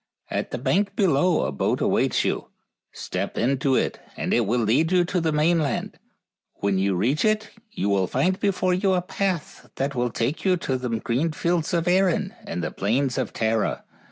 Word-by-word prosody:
At -, -, -2 dB
the -, -, -4 dB
bank 195 Hz, -, 0 dB
below 175 Hz, -2 st, +3 dB
a -, -, -2 dB
boat 70 Hz, -, 0 dB
awaits -, -, +1 dB
you. -, -, -1 dB, 0.4 s
Step -, -, -4 dB
into 135 Hz, +2 st, +1 dB
it -, -, 0 dB, 0.2 s
and -, -, -1 dB
it 120 Hz, -3 st, +2 dB
will 120 Hz, +3 st, +1 dB
lead 135 Hz, -, +2 dB
you 180 Hz, -1 st, +4 dB
to 180 Hz, 0 st, -1 dB
the 160 Hz, -1 st, +1 dB
mainland, 155 Hz, -2 st, +1 dB
and -, -, -27 dB, 0.6 s
when 100 Hz, -1 st, 0 dB
you 95 Hz, 0 st, +1 dB
reach 120 Hz, +11 st, +1 dB
it 215 Hz, 0 st, +1 dB, 0.2 s
you 100 Hz, -, -3 dB
will 100 Hz, -2 st, +2 dB
find 180 Hz, -, 0 dB
before 185 Hz, -2 st, +1 dB
you 190 Hz, +1 st, +2 dB
a 180 Hz, -1 st, +1 dB
path 185 Hz, -3 st, -3 dB
that 140 Hz, +1 st, -1 dB
will 125 Hz, -2 st, 0 dB
take 120 Hz, +6 st, -2 dB
you 185 Hz, -2 st, +3 dB
to 130 Hz, -6 st, -2 dB
the 125 Hz, -1 st, -3 dB
green 120 Hz, +7 st, -1 dB
fields 170 Hz, -1 st, 0 dB
of 170 Hz, 0 st, 0 dB
Erin 190 Hz, +2 st, +2 dB
and 85 Hz, +1 st, -3 dB
the -, -, -2 dB
plains 125 Hz, +6 st, 0 dB
of 125 Hz, -, -2 dB
Tara. 110 Hz, 0 st, 0 dB
150 Hz, 195 wpm, -24 LUFS, 120-180 Hz, 0.6 s, you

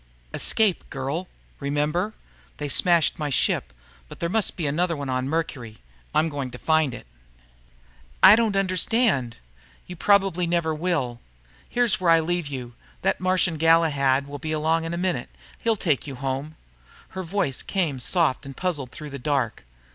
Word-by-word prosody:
"Escape, 215 Hz, -5 st, +2 dB
girl. 140 Hz, +7 st, -3 dB, 0.3 s
Remember? 150 Hz, +8 st, -1 dB, 0.4 s
They 150 Hz, -, -4 dB
smashed 170 Hz, +4 st, +3 dB
my 150 Hz, -1 st, -2 dB
ship. 65 Hz, -, +1 dB, 0.4 s
But -, -, -11 dB
there 170 Hz, -, -1 dB
must 220 Hz, +2 st, +1 dB
be 165 Hz, -, -2 dB
another 165 Hz, +3 st, 0 dB
one 140 Hz, -2 st, -5 dB
on 130 Hz, +1 st, -1 dB
Mercury. 130 Hz, -8 st, -3 dB, 0.4 s
I'm 160 Hz, -, +3 dB
going 140 Hz, -4 st, -4 dB
to 125 Hz, -, -9 dB
find 155 Hz, -3 st, +1 dB
it." -, -, -11 dB, 1.2 s
"I 205 Hz, -, +10 dB
don't 225 Hz, -3 st, +1 dB
understand." 190 Hz, -, +1 dB, 0.5 s
"You 180 Hz, -, -8 dB
probably 190 Hz, -2 st, +2 dB
never 170 Hz, -2 st, 0 dB
will. 150 Hz, -8 st, -1 dB, 0.5 s
Here's 240 Hz, -5 st, +2 dB
where 175 Hz, -, +2 dB
I 165 Hz, 0 st, +6 dB
leave 175 Hz, 0 st, -1 dB
you. 125 Hz, -4 st, -6 dB, 0.3 s
That 195 Hz, -, +1 dB
Martian 185 Hz, -2 st, +1 dB
Galahad 150 Hz, -4 st, +3 dB
will 145 Hz, 0 st, -8 dB
be 155 Hz, +3 st, -3 dB
along 160 Hz, +1 st, +1 dB
any 170 Hz, +1 st, -3 dB
minute. 175 Hz, -8 st, -2 dB, 0.3 s
He'll 230 Hz, -1 st, +1 dB
take 155 Hz, -8 st, 0 dB
you 140 Hz, -, -6 dB
home." 135 Hz, +4 st, -4 dB, 0.5 s
Her 190 Hz, -, -6 dB
voice 175 Hz, -7 st, -2 dB
came 165 Hz, -9 st, -1 dB
soft 140 Hz, +2 st, +1 dB
and 135 Hz, -1 st, -10 dB
puzzled 155 Hz, -9 st, -2 dB
through 150 Hz, +3 st, -9 dB
the 140 Hz, -, -6 dB
dark. 130 Hz, -, -1 dB
160 Hz, 160 wpm, -24 LUFS, 140-180 Hz, 1.2 s, I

